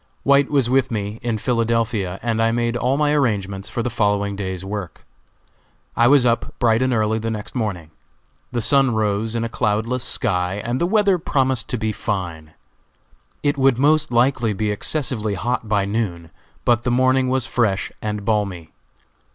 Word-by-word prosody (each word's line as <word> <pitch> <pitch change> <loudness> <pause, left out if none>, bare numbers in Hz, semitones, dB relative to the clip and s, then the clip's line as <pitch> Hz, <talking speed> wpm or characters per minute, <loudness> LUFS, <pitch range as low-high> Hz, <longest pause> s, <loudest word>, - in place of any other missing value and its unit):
White 140 0 +4
was 140 -5 +2
with 130 0 +2
me, 105 -1 -4
in 115 -2 -1
Philadelphia, 115 -5 -1
and 115 -1 0
I 115 0 +3
made 120 0 0
all 125 +3 +1
my 150 0 +2
arrangements 100 -8 -1
for 120 - -3
the 125 - -1
following 100 -1 0
day's 95 -2 -5
work. 100 -3 -6 0.9
I 120 - +4
was 135 -1 +5
up 120 -1 0
bright 115 0 +2
and 130 0 +1
early 110 -1 +1
the 115 +1 -3
next 110 -2 -5
morning. 95 -10 -3 0.6
The 120 -2 -1
sun 135 -3 +3
rose 110 +1 0
in 115 - -1
a - - -1
cloudless 115 +2 -1
sky, 90 -8 0
and 120 +2 -2
the 170 - +2
weather 200 -2 +3
promised 130 -6 0
to 125 - -1
be 110 -1 -1
fine. 85 -8 -4 0.9
It 145 -1 +1
would 135 -2 +4
most 150 +2 +2
likely 120 -2 +2
be 105 +1 -1
excessively 110 -2 -2
hot 110 +3 -2
by 100 -2 +2
noon, 100 -6 -3 0.3
but 120 -1 +3
the 125 - -1
morning 130 +1 +2
was 130 -1 +1
fresh 110 -7 0
and 105 -1 -4
balmy. 100 -7 -1
115 Hz, 175 wpm, -21 LUFS, 105-125 Hz, 0.9 s, was